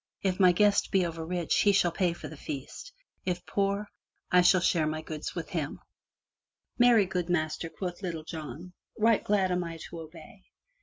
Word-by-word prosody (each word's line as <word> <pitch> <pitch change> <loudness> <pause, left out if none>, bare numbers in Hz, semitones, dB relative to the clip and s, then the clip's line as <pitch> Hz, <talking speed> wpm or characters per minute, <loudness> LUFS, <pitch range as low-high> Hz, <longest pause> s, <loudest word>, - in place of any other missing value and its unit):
If 190 -1 0
my 185 -2 +7
guest 205 +3 +3
be 190 -2 +2
over 165 -1 -4
rich 175 0 0
he 205 - +5
shall 190 -3 +3
pay 175 +1 +1
for - - -8
the 155 - -9
feast; 145 - -7 0.3
if 180 -1 -3
poor, 200 +1 0 0.4
I 180 - +5
will 185 - +3
share 170 -3 +2
my 155 +1 -3
goods 155 -1 -6
with 170 -3 -5
him/' 155 -4 -3 1.0
"Marry, 240 -4 +6
good 180 -1 -3
Master,*' 160 -1 -1
quoth 180 +1 -6
Little 170 -5 -4
John, 165 +2 -8 0.2
"Right 225 0 +3
glad 195 -3 +2
I - - +2
am 170 -2 -3
to 165 +1 -9
obey." 160 +4 -12
175 Hz, 185 wpm, -29 LUFS, 160-190 Hz, 1.0 s, my